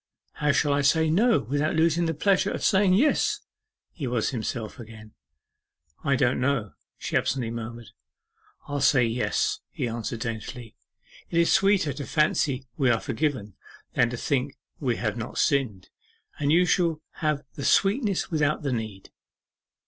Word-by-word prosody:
How 150 Hz, -1 st, +1 dB
shall 145 Hz, 0 st, +2 dB
I 140 Hz, -, +2 dB
say 160 Hz, +3 st, +3 dB
"No" 225 Hz, +7 st, +3 dB
without 145 Hz, +7 st, -1 dB
losing 165 Hz, +1 st, +2 dB
the 165 Hz, -, -1 dB
pleasure 195 Hz, +5 st, +2 dB
of -, -, -4 dB
saying 190 Hz, -1 st, +4 dB
"Yes?"' 285 Hz, +9 st, +2 dB, 0.5 s
He 145 Hz, -6 st, -5 dB
was 120 Hz, -2 st, 0 dB
himself 115 Hz, -2 st, -4 dB
again. 110 Hz, -2 st, -11 dB, 0.9 s
'I 140 Hz, -2 st, +2 dB
don't 125 Hz, -1 st, +1 dB
know,' 125 Hz, -7 st, 0 dB, 0.3 s
she -, -, -5 dB
absently 125 Hz, -4 st, 0 dB
murmured. 115 Hz, 0 st, -7 dB, 0.8 s
'I'll 145 Hz, -1 st, -3 dB
say 130 Hz, -3 st, +4 dB
"Yes,"' 115 Hz, +2 st, 0 dB
he -, -, -3 dB
answered 115 Hz, 0 st, -4 dB
daintily. 115 Hz, 0 st, -6 dB, 0.5 s
'It 170 Hz, -, -2 dB
is 170 Hz, -, +2 dB
sweeter 195 Hz, -7 st, +3 dB
to 140 Hz, +1 st, -7 dB
fancy 145 Hz, -3 st, +1 dB
we 135 Hz, -5 st, +2 dB
are 115 Hz, -2 st, +3 dB
forgiven, 125 Hz, -7 st, -2 dB, 0.4 s
than 120 Hz, -, +3 dB
to 125 Hz, -, -5 dB
think 135 Hz, +2 st, -1 dB, 0.2 s
we 125 Hz, -5 st, 0 dB
have 110 Hz, -1 st, -2 dB
not 115 Hz, -, -6 dB
sinned; 125 Hz, -10 st, 0 dB, 0.5 s
and 145 Hz, -1 st, +1 dB
you 175 Hz, +3 st, +5 dB
shall 170 Hz, -3 st, +1 dB, 0.2 s
have 150 Hz, -3 st, -1 dB
the 140 Hz, -, -7 dB
sweetness 200 Hz, -, +2 dB
without 150 Hz, -1 st, +1 dB
the 140 Hz, -3 st, -1 dB
need. 110 Hz, -4 st, -5 dB
140 Hz, 155 wpm, -26 LUFS, 115-160 Hz, 0.9 s, you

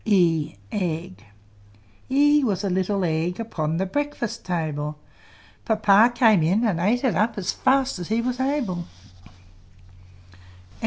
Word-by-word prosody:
E 170 Hz, -, +2 dB, 1.5 s
E 290 Hz, +2 st, +4 dB
was 205 Hz, -5 st, -1 dB
a 195 Hz, -, -1 dB
little 190 Hz, +1 st, 0 dB
Egg, 165 Hz, +3 st, -1 dB
Upon 165 Hz, -8 st, -3 dB
the 190 Hz, -, 0 dB
breakfast 290 Hz, +1 st, -3 dB
table; 155 Hz, -4 st, -3 dB, 0.7 s
Papa 215 Hz, +1 st, +4 dB
came 225 Hz, -7 st, +4 dB
in 190 Hz, +9 st, +2 dB
and 190 Hz, -7 st, 0 dB
ate 220 Hz, +9 st, +1 dB
it 255 Hz, -, +1 dB
up 220 Hz, +1 st, 0 dB
As 190 Hz, -2 st, -1 dB
fast 265 Hz, -5 st, +1 dB
as 175 Hz, -, -6 dB
he 220 Hz, +1 st, 0 dB
was 250 Hz, +2 st, -2 dB
able. 260 Hz, -11 st, -1 dB
205 Hz, 125 wpm, -23 LUFS, 175-245 Hz, 1.5 s, E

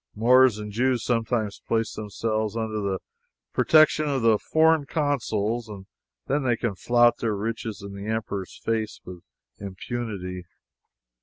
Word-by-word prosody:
Moors 125 Hz, +1 st, +5 dB
and 105 Hz, -1 st, -6 dB
Jews 125 Hz, +1 st, +1 dB
sometimes 115 Hz, -3 st, -1 dB
place 115 Hz, -1 st, 0 dB
themselves 110 Hz, +1 st, -2 dB
under 110 Hz, -1 st, -2 dB
the 100 Hz, -1 st, -1 dB, 0.6 s
protection 155 Hz, -1 st, +4 dB
of 135 Hz, -4 st, -1 dB
the 110 Hz, -2 st, +4 dB
foreign 160 Hz, -2 st, +3 dB
consuls, 120 Hz, -7 st, -1 dB
and 100 Hz, -2 st, -9 dB, 0.4 s
then 145 Hz, +2 st, 0 dB
they 120 Hz, -3 st, +1 dB
can 115 Hz, -3 st, -2 dB
flout 120 Hz, +4 st, +3 dB
their 110 Hz, -3 st, -1 dB
riches 110 Hz, 0 st, -4 dB
in 100 Hz, 0 st, -8 dB
the 100 Hz, +1 st, -7 dB
Emperor's 100 Hz, -4 st, -4 dB
face 110 Hz, -1 st, -1 dB
with 90 Hz, -1 st, -9 dB, 0.4 s
impunity. 95 Hz, -3 st, -5 dB
110 Hz, 140 wpm, -25 LUFS, 105-120 Hz, 0.6 s, Moors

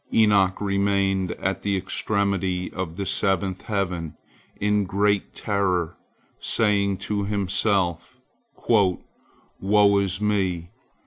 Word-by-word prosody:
Enoch 100 Hz, -4 st, +3 dB
remained 100 Hz, -2 st, 0 dB
at 95 Hz, +1 st, -3 dB
the 100 Hz, -1 st, 0 dB
extremity 95 Hz, -1 st, -1 dB
of 90 Hz, -2 st, -5 dB
the 100 Hz, -, -3 dB
seventh 95 Hz, -1 st, 0 dB
heaven, 90 Hz, -6 st, -2 dB, 0.4 s
in 105 Hz, 0 st, +2 dB
great 100 Hz, +1 st, 0 dB
terror, 95 Hz, -5 st, -1 dB, 0.4 s
saying 100 Hz, -3 st, +1 dB
to 100 Hz, +1 st, -2 dB
himself, 100 Hz, 0 st, 0 dB, 0.5 s
"Woe 100 Hz, 0 st, +1 dB
is 95 Hz, -1 st, -1 dB
me! 95 Hz, -5 st, -1 dB
100 Hz, 100 wpm, -24 LUFS, 95-100 Hz, 0.5 s, Enoch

